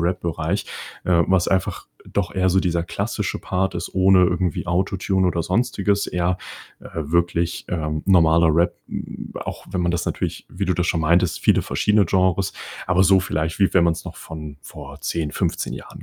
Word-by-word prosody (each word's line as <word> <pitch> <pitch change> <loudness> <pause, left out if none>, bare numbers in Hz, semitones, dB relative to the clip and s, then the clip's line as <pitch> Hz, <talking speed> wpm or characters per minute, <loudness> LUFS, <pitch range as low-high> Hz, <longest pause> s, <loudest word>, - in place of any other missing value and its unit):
Rap-Bereich, 85 +1 -1 0.4
äh, 85 -2 +4
was 95 -2 +3
einfach, 95 -2 -1 0.2
äh, - - -15
doch 100 -2 -1
eher 95 0 +2
so 95 +1 +3
dieser 85 -2 +1
klassische 85 - -3
Part 95 -1 -1
ist 85 - -6
ohne 95 -1 +5
irgendwie 90 -1 -1
Autotune 95 +1 0
oder 85 -1 -1
sonstiges, 100 -2 0
eher, 90 +1 0 0.4
äh, - - -11
wirklich, 85 +2 0
ähm, 75 -3 -2
normaler 85 -3 +5
Rap, 85 +2 +2
hm, - - -7
auch - - -6
wenn 90 - -1
man 85 0 +1
das 85 - -1
natürlich - - -3
wie 95 +2 -3
du 90 -2 +1
das 85 +1 0
schon 80 - +1
meintest, 85 +2 +2
viele - - +3
verschiedene 105 -3 +2
Genres, 95 +1 +1 0.4
aber 95 +1 +4
so 95 0 +5
vielleicht, 80 -2 -2
wie 95 - +4
wenn 90 -2 +5
man's 85 -1 0
noch - - -8
von 75 -2 -8
vor - - -10
10, 80 -3 -2
15 - - -2
Jahren - - -11
90 Hz, 185 wpm, -22 LUFS, 85-95 Hz, 0.4 s, ohne